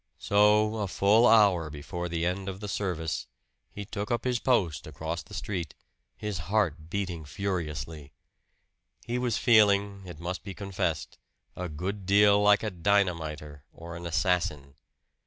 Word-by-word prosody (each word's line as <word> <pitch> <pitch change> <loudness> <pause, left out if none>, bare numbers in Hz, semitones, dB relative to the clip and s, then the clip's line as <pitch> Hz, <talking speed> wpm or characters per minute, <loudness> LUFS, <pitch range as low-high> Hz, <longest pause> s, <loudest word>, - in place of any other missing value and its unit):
So, 105 +2 +3
a 105 -2 -1
full 105 +6 +4
hour 100 -8 +5
before 85 +4 -5
the 85 0 -1
end 95 +2 -2
of 95 0 -7
the 105 - -6
service, 90 -8 -3 0.4
he 100 - -7
took 105 0 -5
up 120 - 0
his 125 -2 0
post 90 - +1
across 80 +2 -4
the 105 - -11
street, 90 -4 -4 0.4
his 105 -4 -4
heart 85 -7 0
beating 90 -4 -3
furiously. 75 -3 -4 0.9
He 120 +1 -2
was 120 -3 0
feeling, 100 -4 +4
it 85 -4 -9
must 90 +2 -4
be 95 -1 -7
confessed, 90 -6 -3 0.4
a 90 -1 -4
good 95 +5 -5
deal 100 +1 +5
like 105 0 +5
a 110 - -2
dynamiter 85 -6 -1
or 85 +1 -9
an 85 +1 -6
assassin. 80 -3 0
95 Hz, 150 wpm, -28 LUFS, 85-105 Hz, 0.9 s, hour